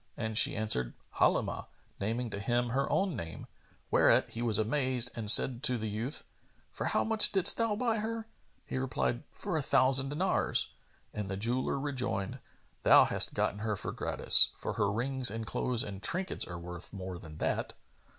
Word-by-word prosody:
and 110 Hz, -1 st, -4 dB
she -, -, +5 dB
answered, 65 Hz, -, -3 dB, 0.2 s
"Halimah," -, -, 0 dB, 0.3 s
naming 115 Hz, +3 st, -3 dB
to 100 Hz, -, -5 dB
him 120 Hz, +4 st, -1 dB
her 135 Hz, +3 st, -2 dB
own 195 Hz, -5 st, 0 dB
name; 85 Hz, -7 st, -8 dB, 0.5 s
whereat -, -, +3 dB
he 115 Hz, -, -6 dB
was 115 Hz, -4 st, 0 dB
amazed 125 Hz, +1 st, -1 dB
and 110 Hz, -3 st, -2 dB
said 120 Hz, +2 st, +6 dB
to 130 Hz, -4 st, +2 dB
the 110 Hz, -1 st, -5 dB
youth, 115 Hz, +8 st, -5 dB, 0.5 s
"For -, -, -6 dB
how -, -, 0 dB
much 220 Hz, -1 st, +5 dB
didst 190 Hz, -1 st, +2 dB
thou 230 Hz, -2 st, -1 dB
buy 230 Hz, 0 st, -1 dB
her?" 225 Hz, +1 st, -5 dB, 0.4 s
He 130 Hz, -, -5 dB
replied, 65 Hz, -, -2 dB
"For -, -, -4 dB
a -, -, -1 dB
thousand 130 Hz, +1 st, +2 dB
dinars"; 170 Hz, +7 st, 0 dB, 0.4 s
and 105 Hz, -2 st, -5 dB
the 95 Hz, -, -4 dB
jeweller 120 Hz, +6 st, -1 dB
rejoined, 125 Hz, -9 st, -3 dB, 0.4 s
"Thou -, -, +6 dB
hast -, -, +1 dB
gotten 105 Hz, -, -2 dB
her 110 Hz, 0 st, -3 dB
gratis; -, -, +6 dB
for -, -, -6 dB
her 100 Hz, -1 st, -1 dB
rings 130 Hz, +3 st, -1 dB
and 110 Hz, +2 st, -6 dB
clothes 120 Hz, +1 st, -1 dB
and 100 Hz, -2 st, -8 dB
trinkets 185 Hz, -, -1 dB
are 90 Hz, -, -8 dB
worth 85 Hz, 0 st, -10 dB
more 95 Hz, -3 st, -8 dB
than 75 Hz, -2 st, -12 dB
that." -, -, -3 dB
115 Hz, 175 wpm, -30 LUFS, 100-135 Hz, 0.5 s, said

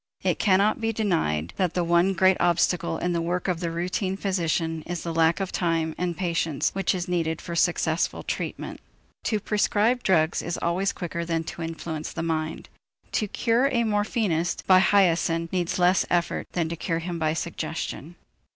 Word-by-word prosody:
It -, -, +1 dB
cannot 205 Hz, +3 st, +3 dB
be 225 Hz, 0 st, +1 dB
denied 160 Hz, -, 0 dB
that 180 Hz, -3 st, 0 dB
the 180 Hz, -, +1 dB
one 170 Hz, +3 st, +3 dB
great 190 Hz, +1 st, +4 dB
obstacle 175 Hz, -1 st, +1 dB
in 175 Hz, +1 st, -1 dB
the 170 Hz, -, 0 dB
work 175 Hz, +3 st, -2 dB
of 180 Hz, -3 st, 0 dB
the 170 Hz, -1 st, -2 dB
routine 180 Hz, +3 st, -2 dB
physician 165 Hz, -4 st, -1 dB
is 175 Hz, -1 st, -4 dB
the 170 Hz, -, -3 dB
lack 165 Hz, +2 st, +3 dB
of 195 Hz, -1 st, -2 dB
time 165 Hz, -2 st, 0 dB
and 175 Hz, -2 st, -2 dB
patience 165 Hz, -5 st, 0 dB
which 195 Hz, -1 st, 0 dB
is 180 Hz, 0 st, -3 dB
needed 165 Hz, -3 st, -1 dB
for 170 Hz, -, -6 dB
successful 165 Hz, -1 st, +1 dB
treatment. -, -, -4 dB, 0.4 s
To 215 Hz, -, +1 dB
prescribe 210 Hz, +4 st, +1 dB
drugs 165 Hz, -6 st, +2 dB
is 170 Hz, -, -3 dB
always 185 Hz, +3 st, 0 dB
quicker 170 Hz, -1 st, -4 dB
than 165 Hz, -1 st, -1 dB
to 165 Hz, -, -7 dB
influence 160 Hz, -1 st, -5 dB
the 165 Hz, -, -3 dB
mind; 160 Hz, -1 st, -2 dB, 0.4 s
to 215 Hz, -, 0 dB
cure 235 Hz, +5 st, +2 dB
a 240 Hz, -4 st, +1 dB
morphinist 205 Hz, -5 st, 0 dB
by 185 Hz, -1 st, +7 dB
hyoscine 170 Hz, -4 st, +3 dB
needs 175 Hz, -2 st, -1 dB
less 180 Hz, +1 st, +4 dB
effort 175 Hz, -1 st, 0 dB
than 170 Hz, -2 st, 0 dB
to 170 Hz, -, -3 dB
cure 165 Hz, 0 st, -2 dB
him 170 Hz, 0 st, -4 dB
by 155 Hz, -1 st, +1 dB
suggestion. 165 Hz, 0 st, -4 dB
175 Hz, 180 wpm, -25 LUFS, 165-190 Hz, 0.4 s, by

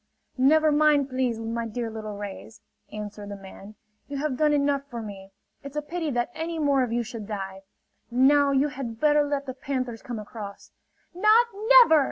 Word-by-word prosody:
"Never 310 Hz, +4 st, +5 dB
mind, 295 Hz, -2 st, +3 dB
please, 255 Hz, -3 st, -1 dB
my 230 Hz, +1 st, -3 dB
dear 230 Hz, 0 st, -4 dB
little 215 Hz, -2 st, -6 dB
rays!" 205 Hz, +2 st, -8 dB, 0.3 s
answered 210 Hz, -1 st, -7 dB
the 200 Hz, -, -5 dB
man. 195 Hz, +1 st, -12 dB, 0.3 s
"You 280 Hz, -, -5 dB
have 285 Hz, -1 st, -1 dB
done 300 Hz, +3 st, +2 dB
enough 285 Hz, -1 st, +2 dB
for 240 Hz, -, -6 dB
me! 200 Hz, -3 st, -8 dB, 0.3 s
It's 280 Hz, +1 st, -9 dB
a 300 Hz, -, 0 dB
pity 325 Hz, +1 st, -3 dB
that 240 Hz, -2 st, -1 dB
any 330 Hz, +1 st, -4 dB
more 285 Hz, -3 st, +2 dB
of 250 Hz, -3 st, -1 dB
you 240 Hz, +1 st, 0 dB
should 220 Hz, -2 st, -8 dB
die. 195 Hz, -2 st, -5 dB, 0.5 s
Now 280 Hz, +4 st, +4 dB
you 280 Hz, +1 st, +2 dB
had 245 Hz, -5 st, -6 dB
better 300 Hz, +1 st, +4 dB
let 285 Hz, -1 st, -2 dB
the 260 Hz, -, -5 dB
panthers 255 Hz, -3 st, -4 dB
come 240 Hz, -2 st, -6 dB
across." 210 Hz, -1 st, -9 dB, 0.4 s
"Not 430 Hz, +6 st, +5 dB, 0.2 s
never!" 485 Hz, -11 st, +8 dB
255 Hz, 185 wpm, -26 LUFS, 220-290 Hz, 0.5 s, never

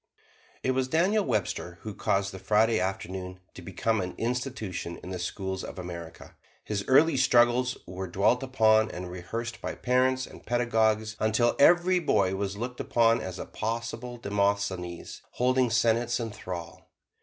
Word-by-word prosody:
It 130 Hz, -, +2 dB
was 130 Hz, 0 st, 0 dB
Daniel 185 Hz, +9 st, +2 dB
Webster 100 Hz, -6 st, -2 dB
who 110 Hz, -, -5 dB
caused 100 Hz, 0 st, 0 dB
the 95 Hz, -, -7 dB
Friday 110 Hz, +2 st, +3 dB
Afternoon 95 Hz, -1 st, -4 dB
to -, -, -10 dB
become 100 Hz, +4 st, -1 dB
an 90 Hz, 0 st, -5 dB
institution 115 Hz, -8 st, -3 dB
in 90 Hz, -, -7 dB
the 90 Hz, -, -4 dB
schools 95 Hz, +1 st, -4 dB
of -, -, -8 dB
America. 85 Hz, -2 st, -8 dB, 0.3 s
His 100 Hz, -2 st, -2 dB
early 145 Hz, +4 st, +5 dB
struggles 125 Hz, 0 st, +3 dB
were 95 Hz, +1 st, -6 dB
dwelt 100 Hz, +8 st, +2 dB
upon 110 Hz, -4 st, +3 dB
and 90 Hz, 0 st, -6 dB
rehearsed 115 Hz, +7 st, -5 dB
by -, -, -4 dB
parents 130 Hz, +1 st, +1 dB
and -, -, -13 dB
pedagogues 110 Hz, -3 st, +1 dB
until 110 Hz, +2 st, +2 dB
every 175 Hz, +4 st, +5 dB
boy 100 Hz, -, +2 dB
was 100 Hz, +1 st, -3 dB
looked 125 Hz, +3 st, -5 dB
upon 115 Hz, 0 st, +3 dB
as 95 Hz, -1 st, -6 dB
a -, -, -5 dB
possible 115 Hz, +2 st, -4 dB
Demosthenes 100 Hz, -4 st, -2 dB
holding 130 Hz, 0 st, +2 dB
senates 115 Hz, +1 st, +2 dB
in 115 Hz, -2 st, -3 dB
thrall. 90 Hz, -5 st, -8 dB
110 Hz, 155 wpm, -28 LUFS, 95-125 Hz, 0.3 s, early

